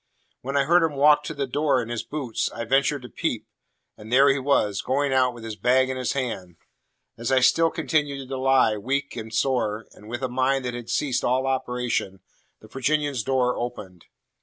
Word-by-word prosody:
When 135 +2 -2
I 140 - +4
heard 170 +5 +4
him 160 -3 0
walk 150 +1 +5
to 155 - -5
the 140 0 -1
door 140 0 +1
in 115 -1 -4
his 120 -2 -2
boots, 140 -7 -3
I 115 - -5
ventured 135 +2 +1
to 125 - -9
peep; - - -3 0.5
and 110 +2 -12
there 135 +3 +6
he 135 0 +2
was, 115 -7 +1
going 135 +1 0
out 130 -1 +3
with 120 -2 -12
his 110 -1 -5
bag 130 +3 +2
in 130 - -4
his 125 -3 -1
hand. 100 -10 -4 0.6
As 120 +2 -2
I 130 - +5
still 165 +5 +4
continued 140 -5 -1
to 135 - -3
lie, 130 -4 +3
weak 140 +6 -2
and 110 -2 -7
sore, 110 -3 0
and 105 - -15
with 120 +3 -5
a - - +1
mind 130 +1 0
that 125 - -3
had 120 -1 -7
ceased 130 +1 0
all 130 +2 +1
operation, 125 -7 -2 0.4
the 110 - -14
Virginian's 140 +1 -1
door 125 0 +1
opened. 95 -8 -6
130 Hz, 205 wpm, -24 LUFS, 120-140 Hz, 0.6 s, there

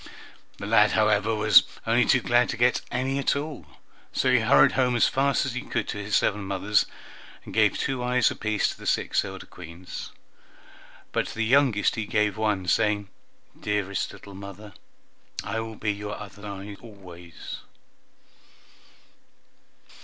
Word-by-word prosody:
The - - -7
lad, 105 0 +4
however, 110 0 +2
was 105 0 +7 0.2
only 120 +1 +3
too 130 - +3
glad 120 +1 +2
to 120 - -3
get 120 +1 +3
any 130 +2 -1
at 140 - +1
all, 145 - -5 0.4
so - - +1
he - - +5
hurried 70 0 +5
home 125 -2 +1
as 120 - +4
fast 140 +1 +1
as 130 - -3
he 125 - -3
could - - -3
to 105 - -4
his 100 0 -2
seven 105 0 +1
mothers, 100 +2 +1 0.6
and - - -9
gave - - +3
two 130 -2 -2
eyes 125 -1 +2
apiece 105 -1 0
to - - -8
the - - -8
six - - +1
elder - - -8
Queens; 90 +1 -9 1.0
but - - 0
to - - -8
the 115 0 0
youngest 125 -4 +3
he 110 -2 -3
gave 105 -2 +1
one, 105 -4 -1
saying, 105 0 +1 0.5
"Dearest 100 -2 -2
little 100 - -12
mother! 100 +1 -10 0.7
I 110 +3 -3
will 110 0 -6
be 105 0 -1
your 105 +1 -6
other 105 0 -10
eye 100 0 -7
always!" 90 -7 -10
105 Hz, 160 wpm, -26 LUFS, 100-120 Hz, 1.0 s, was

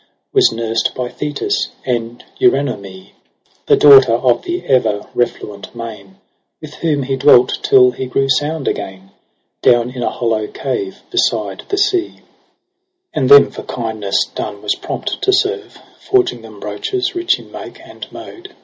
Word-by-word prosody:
Was - - +5
nursed 115 0 -2
by 125 -1 -3
Thetis, 145 +2 -2 0.2
and 120 -1 -3
Eurynome, 100 - -1 0.6
The - - +6
daughter 135 -5 +7
of 120 +1 +2
the 350 +1 -4
ever 110 -6 +1
refluent 105 -4 -3
main 115 - -9 0.4
With 155 -1 -10
whom 150 -4 -1
he 135 +1 -1
dwelt 130 -2 +4
tUl 125 -1 +5
he 130 - -5
grew 135 +2 0
sound 145 +2 0
again, 95 0 -5 0.5
Down 120 0 +3
in 125 -1 -7
a - - 0
hollow 110 -3 -1
cave 390 - -4
beside - - -1
the 400 - -1
sea: 395 -3 0 0.5
+ 370 -1 -56
And 130 -2 0
them 140 0 +8
for - - -8
kindness 110 -4 -2
done 105 -1 -6
was 105 - +1
prompt - - -5
to 390 - +2
serve, 405 +2 -1 0.2
Forging 375 -2 +1
them - - -13
brooches 395 -2 -3
rich 355 +2 +1
in - - -15
make - - -9
and - - -11
mode. 380 +3 -11
130 Hz, 155 wpm, -16 LUFS, -, 0.6 s, them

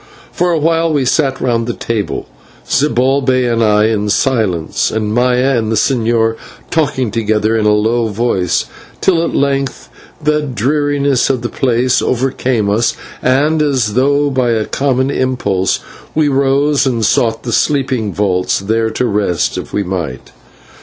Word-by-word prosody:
For 175 0 0
a 165 - +1
while 165 +1 +1
we 145 -4 +1
sat 135 0 +1
round 115 -2 0
the 120 - -3
table, 110 -3 -3 0.4
Zibalbay 130 -1 +1
and 115 -1 +1
I 105 -1 +3
in 105 -2 -1
silence, 105 -8 0
and 110 -1 -2
Maya 125 +2 +2
and 110 -2 -1
the - - +1
señor 115 -1 +1 0.3
talking 135 -8 0
together 110 0 0
in 110 -1 +1
a - - +4
low 115 +2 +1
voice, 105 -5 0 0.3
till 170 -3 +2
at - - -2
length 140 -1 -1 0.3
the 150 -1 +1
dreariness 140 +1 0
of 130 -3 -1
the 120 - -2
place 125 -1 +1
overcame 125 -3 0
us, 110 +4 +1 0.3
and, 145 +5 +2
as 130 -8 0
though 140 +3 +2
by 130 -2 +1
a 110 -2 0
common 135 -1 0
impulse, 100 -9 0 0.4
we 155 -1 +2
rose 140 +1 +2
and 115 -4 0
sought 115 0 +1
the 120 - -3
sleeping 130 -7 0
vaults, 90 -2 0
there 110 +3 0
to 110 +3 -1
rest, 100 -6 0
if - - -6
we 100 - -1
might. 90 -3 -5
125 Hz, 155 wpm, -14 LUFS, 110-140 Hz, 0.4 s, a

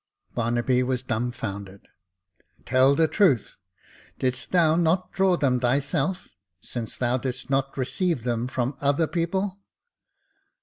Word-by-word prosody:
Barnaby 120 +2 +1
was 130 0 -1
dumbfounded. 105 -5 -4 0.8
Tell 130 +2 +4
the 160 +2 +4
truth; 155 - +2 0.6
didst 130 -2 -2
thou 165 -3 +4
not 175 +2 +1
draw 190 -2 +2
them 130 -5 +2
thyself, 140 +7 0 0.3
since 115 +3 -6
thou 125 0 +1
didst 130 +1 -5
not 135 0 0
receive 140 +2 -1
them 120 0 -1
from 130 +1 -2
other 145 +3 +2
people." 185 +4 -2
130 Hz, 120 wpm, -25 LUFS, 120-165 Hz, 0.8 s, Tell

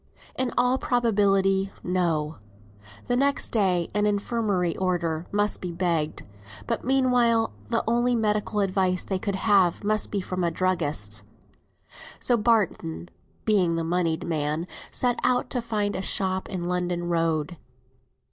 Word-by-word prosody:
In 260 -1 -1
all 250 +2 +3
probability, 195 -5 +2
no; 165 -4 0 0.7
the 245 - 0
next 280 +2 +1
day 185 -6 +1
an 210 +1 +2
infirmary 205 -4 0
order 170 -3 -1
might 205 +1 +1
be 180 - -4
begged, 170 -3 -1 0.4
but - - -2
meanwhile 245 - +2 0.2
the - - +1
only 240 +2 +2
medical 210 -1 0
advice 185 -2 +1
they 190 -2 -2
could 200 0 -2
have 195 -3 +3
must 215 +1 +1
be 205 - -1
from 185 -1 -3
a 170 - +2
druggist's. 150 - -1 1.0
So 245 - +2
Barton 205 - 0 0.4
(being 185 -6 +3
the 165 - -1
moneyed 165 -1 0
man) 155 0 -1 0.2
set 245 -1 0
out 250 0 +1
to 250 - -1
find 210 -3 -1
a 185 - -2
shop 190 -1 0
in 185 -3 -4
London 175 0 -1
Road. 165 -1 0
190 Hz, 140 wpm, -25 LUFS, 170-220 Hz, 1.0 s, all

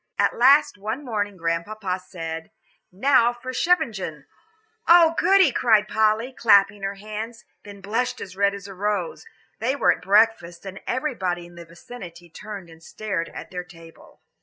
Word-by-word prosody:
At - - +2
last 265 -3 +4
one 220 +8 -4
morning 205 -4 -3
Grandpapa 180 +3 -2
said, 165 -3 -7 0.4
"Now 240 +4 +3
for 250 +2 -8
Scheveningen 325 -5 +2
to 175 -7 -6
day!" - - -28 0.6
"Oh, 335 -1 +7
goody!" 380 -6 +4
cried 220 -4 +3
Polly, 220 +4 +1
clapping 200 -4 +4
her 195 +1 -3
hands; 215 +3 -7 0.2
then 200 -1 -12
blushed 230 +6 -2
as 190 -2 -8
red 200 +1 +2
as 200 0 -9
a 195 - -9
rose. 200 -2 -3 0.3
They 255 +5 0
were - - +3
at - - -3
breakfast, 200 -4 +2
and 195 0 -8
everybody 195 - -2
in 175 - -15
the 170 0 -11
vicinity 175 -1 -12
turned 200 0 -9
and 165 -1 -16
stared 185 -2 -4
at - - -10
their 180 -1 -5
table. 165 -1 -17
205 Hz, 165 wpm, -23 LUFS, 180-235 Hz, 0.6 s, Oh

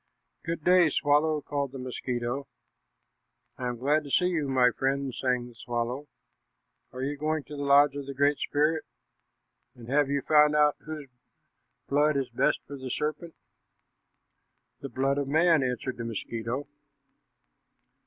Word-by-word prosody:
"Good 165 -2 -4
day, 180 -1 +5
swallow," 150 +2 +2
called 140 -2 -3
the - - -6
mosquito. 125 +1 -4 1.1
"I 125 - -2
am 120 -1 -3
glad 145 +5 +1
to 145 - -9
see 180 - +3
you, 160 -5 -1
my 130 -2 +4
friend," 135 +1 -1
sang 125 -1 -1
the - - -16
swallow. 120 +4 -4 0.8
"Are 130 +1 -5
you 145 +2 -2
going 155 +1 -1
to 150 - -9
the 145 - -5
lodge 140 0 +5
of 140 -1 -6
the 140 - -6
Great 145 +1 +2
Spirit? 155 +2 +1 0.9
And 120 -2 -12
have 140 +1 +2
you 140 -1 0
found 150 -1 +5
out 150 -1 +4
whose 155 -2 -8 0.8
blood 145 +1 +2
is 135 -3 -2
best 120 - +1
for 140 - -8
the 130 -1 -7
serpent?" 155 +5 -3 1.4
"The 140 - -7
blood 135 +2 0
of 140 - -2
man," 160 +2 +4
answered 130 0 -2
the 115 - -4
mosquito. 115 +4 -4
140 Hz, 155 wpm, -28 LUFS, 130-150 Hz, 1.4 s, day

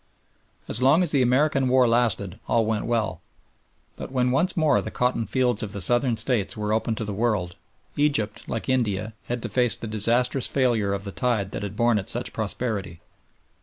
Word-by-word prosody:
As 115 - +3
long 140 +7 +4
as 170 - -2
the 140 - +2
American 135 +1 +2
War 130 -1 +4
lasted 115 -4 +1
all 115 -1 +2
went 110 -1 -2
well, 110 -6 -1 0.7
but - - -8
when 125 -1 +1
once 170 +9 +1
more 155 -4 +3
the - - -5
cotton 125 -2 -1
fields 125 -4 0
of 105 -1 -5
the 100 - -5
Southern 120 +4 +2
States 120 -2 0
were 105 0 -1
open 110 +1 0
to 110 - -4
the 105 - -4
world, 105 -5 -1 0.4
Egypt, 145 -8 0
like 115 - -4
India, 110 -5 -1
had 120 -1 -3
to - - -2
face 125 -2 +3
the - - -7
disastrous 120 +4 +1
failure 120 -7 +1
of 100 0 -3
the 100 - -6
tide 100 -1 -1
that - - -5
had 100 -1 -5
borne 120 -1 +2
it 95 - -7
such 120 +1 -4
prosperity. 100 -5 -3
115 Hz, 195 wpm, -24 LUFS, 105-125 Hz, 0.7 s, long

